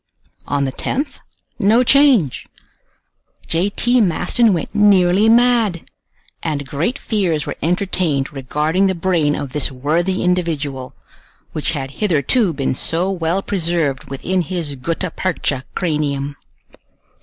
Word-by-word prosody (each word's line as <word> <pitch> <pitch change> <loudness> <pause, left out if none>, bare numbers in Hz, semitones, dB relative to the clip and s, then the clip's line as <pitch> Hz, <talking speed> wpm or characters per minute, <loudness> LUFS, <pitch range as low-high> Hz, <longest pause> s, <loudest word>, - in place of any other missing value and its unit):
On 140 -1 0
the 135 - -2
10th, 280 - -3 0.4
no 220 +5 +4
change! 255 - +3 1.0
J. 170 +5 +1
T. 240 +4 +2
Maston 215 +4 +2
went 170 -5 -2
nearly 205 -1 +4
mad, 230 -6 +3 0.5
and 145 -4 -3
great 165 - -2
fears 180 - -1
were - - -3
entertained 170 -5 0
regarding 150 +7 0
the 190 - 0
brain 165 -4 +1
of 140 -2 -5
this 150 -2 0
worthy 165 +8 -1
individual, 155 -7 -2 0.6
which 155 - -2
had 135 -3 -4
hitherto 190 - +2
been 140 -4 -1
so 170 +8 0
well 175 +1 -1
preserved 165 -7 -1
within 180 +7 -2
his 165 -3 -3
gutta 165 +6 -3
percha 145 -8 -2
cranium. 145 -4 -1
170 Hz, 120 wpm, -18 LUFS, 145-195 Hz, 1.0 s, no